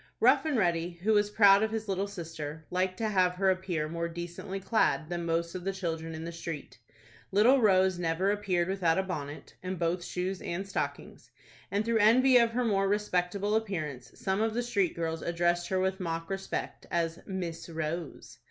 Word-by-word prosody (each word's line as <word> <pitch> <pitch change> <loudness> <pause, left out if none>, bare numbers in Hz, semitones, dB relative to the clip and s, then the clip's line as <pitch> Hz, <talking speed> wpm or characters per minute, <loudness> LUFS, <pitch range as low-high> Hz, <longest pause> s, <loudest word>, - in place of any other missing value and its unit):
Rough - - +5
and 300 -5 +1
Ready, 170 -3 0
who 220 +2 +3
was 205 0 +3
proud 200 -1 +6
of 220 - +1
his 220 0 -4
little 195 0 -1
sister, 160 -5 -7
liked 185 +1 0
to 220 -1 -1
have 185 -3 +3
her 190 +1 +3
appear 180 -5 -2
more 170 +1 -3
decently 175 +3 -6
clad 195 -6 +1
than 170 -1 -3
most 170 0 0
of 185 -1 -5
the 195 - 0
children 165 -3 -4
in 160 +1 -6
the 170 - -4
street. 165 -6 -7 0.5
Little 235 +7 +5
Rose 190 -3 +4
never 175 +3 +1
appeared 190 -4 0
without 185 -3 +1
a 190 - +2
bonnet, 150 -6 -6
and 185 0 -4
both 170 +1 0
shoes 180 +2 -3
and 185 +3 -4
stockings, 195 - -4 0.4
and 205 +2 0
through 230 -1 +2
envy 250 +5 +6
of 235 -1 +5
her 250 +1 +1
more 195 -3 +2
respectable 200 0 0
appearance, 155 - -3
some 190 +2 0
of 225 0 0
the 245 - 0
street 200 -7 0
girls 165 -1 -2
addressed 175 0 0
her 190 - +1
with 190 +1 0
mock 165 -1 -3
respect, 195 0 -4
as 170 0 -1
Miss 175 -4 -5
Rose. 160 0 -5
185 Hz, 190 wpm, -30 LUFS, 170-200 Hz, 0.5 s, proud